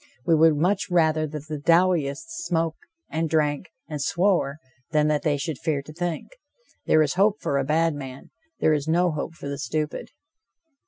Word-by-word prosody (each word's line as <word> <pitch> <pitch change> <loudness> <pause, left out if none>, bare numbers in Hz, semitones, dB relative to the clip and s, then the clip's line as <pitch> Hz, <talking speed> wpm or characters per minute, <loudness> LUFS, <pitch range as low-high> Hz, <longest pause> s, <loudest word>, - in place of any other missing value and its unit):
We 165 - +3
would 160 0 +5
much 185 +6 +1
rather 160 -3 +2
that 150 -1 -7
the 155 -2 -4
Dowieites 170 - +2
smoked 170 - -2 0.3
and 160 0 -2
drank 150 +2 0 0.2
and 150 -2 -5
swore, 175 -3 +1 0.3
than 150 -1 +2
that 150 -1 +1
they 150 -3 +1
should 145 0 -4
fear 150 -4 -1
to 155 - -11
think. 175 -1 -4 0.6
There 155 - +5
is 145 - -1
hope 200 +3 +2
for 140 - 0
a - - +1
bad 160 +3 +2
man. 135 -2 -9 0.3
There 155 - +3
is 150 0 -1
no 175 +2 +3
hope 155 +2 -4
for 140 - -8
the 140 0 -4
stupid. 155 0 -3
155 Hz, 180 wpm, -25 LUFS, 145-170 Hz, 0.6 s, would